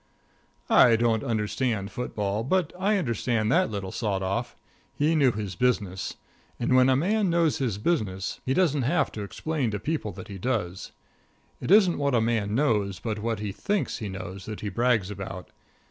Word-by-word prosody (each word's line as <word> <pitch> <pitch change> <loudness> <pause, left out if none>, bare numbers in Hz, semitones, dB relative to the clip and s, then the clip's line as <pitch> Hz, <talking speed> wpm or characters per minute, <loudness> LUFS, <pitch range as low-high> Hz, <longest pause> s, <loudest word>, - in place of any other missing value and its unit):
I 120 -3 +7
didn't 115 -1 +1
understand 110 -2 -1
football, 105 -2 -2
but 175 +4 0
I 205 +2 +2
understood 115 - 0
that 185 +5 +3
little 100 -3 -4
sawed 100 -4 -2
off. 95 +1 -2 0.4
He 150 +3 +2
knew 140 -5 +4
his 105 -3 -4
business. 105 -7 -1 0.4
And 120 +2 +2
when 130 0 +6
a 130 - +4
fellow 205 +9 +1
knows 170 -5 +2
his 120 -8 -1
business, 105 - -1
he 130 - 0
doesn't 155 -7 +2
have 150 +9 +1
to 105 - -6
explain 140 +5 -2
to 105 -1 -3
people 130 -2 -2
that - - -9
he 100 -3 -8
does. 100 -6 -2 0.7
It - - -5
isn't 190 -4 +5
what 140 -2 +1
a - - +4
man 110 -2 0
knows, 105 -9 +1
but 110 -2 -3
what 110 -1 -2
he 105 -2 -3
thinks 205 - -2
he 105 -4 -4
knows 95 0 -7
that 110 -1 -6
he 105 - -3
brags 110 -2 +1
about. 95 -3 -7
115 Hz, 180 wpm, -26 LUFS, 100-140 Hz, 0.7 s, I